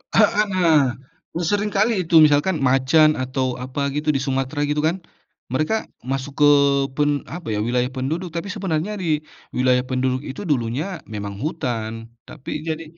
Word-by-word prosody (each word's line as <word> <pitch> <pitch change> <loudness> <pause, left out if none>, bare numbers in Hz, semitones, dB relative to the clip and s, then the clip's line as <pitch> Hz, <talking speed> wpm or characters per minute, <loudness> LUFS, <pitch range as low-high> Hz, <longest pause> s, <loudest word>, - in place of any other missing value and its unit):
Heeh 210 -1 +4
nah, 160 -9 +3 0.4
seringkali 205 +5 +1 0.2
itu 165 - +1
misalkan 150 +5 +3
macan 135 +4 +4
atau 130 -1 -2
apa 135 +2 -3
gitu 150 +1 -3
di 135 - 0
Sumatera 135 +2 -1
gitu 150 +1 0
kan, 175 +1 -2 0.5
mereka 155 - 0 0.3
masuk 135 +1 -3
ke - - +8 0.5
pen 145 +1 +2 0.2
apa 170 -8 -6
ya 105 - -1
wilayah 125 +3 0
penduduk 155 +7 -3
tapi 170 +4 -4
sebenarnya 195 -1 -2
di 160 -4 0 0.3
wilayah 125 0 +2
penduduk 130 +1 -1
itu 135 +7 -7
dulunya 145 +7 -1
memang 100 -1 -5
hutan 115 -7 -3 0.2
tapi 150 +1 -6
jadi 160 0 -3
145 Hz, 150 wpm, -22 LUFS, 130-165 Hz, 0.5 s, ke